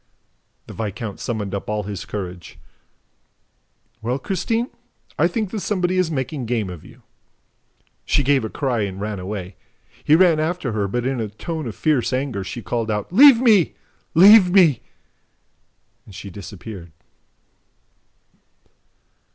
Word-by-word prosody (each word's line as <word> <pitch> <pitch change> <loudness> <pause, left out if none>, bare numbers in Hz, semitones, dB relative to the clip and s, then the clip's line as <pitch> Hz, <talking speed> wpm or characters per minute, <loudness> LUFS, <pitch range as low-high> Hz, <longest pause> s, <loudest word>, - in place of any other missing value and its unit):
The - - -10
viscount 110 0 -5
summoned 105 -5 -4
up 100 - -4
all 105 0 -1
his 100 -2 -6
courage. 90 -4 -7 1.4
"Well, 120 +4 -1
Christine, 225 - -2 0.5
I - - +5
think 215 -5 -3
that 220 - -3
somebody 185 -2 0
is 180 -3 +1
making 135 -3 -3
game 110 -5 -1
of 85 -4 -10
you." - - -17 1.0
She 145 - +1
gave 135 -1 +2
a 110 - -3
cry 130 -3 -2
and 100 -2 -4
ran 105 -1 -4
away. 95 0 -6 0.5
He 150 - +5
ran 170 -2 +4
after 160 -4 -2
her, 105 -2 -1
but, 120 +5 -2
in 130 -2 -1
a 110 - -2
tone 155 - -6
of 110 - -6
fierce 140 -5 0
anger, 130 -6 -2
she 115 +4 -7
called 115 +5 -2
out: 105 - -3
"Leave 265 +2 +8
me! 215 -9 +4 0.4
Leave 195 +2 +8
me!" 175 -7 +4 1.3
And 100 - -13
she 100 - -8
disappeared. 95 -2 -10
120 Hz, 145 wpm, -21 LUFS, 105-170 Hz, 1.4 s, Leave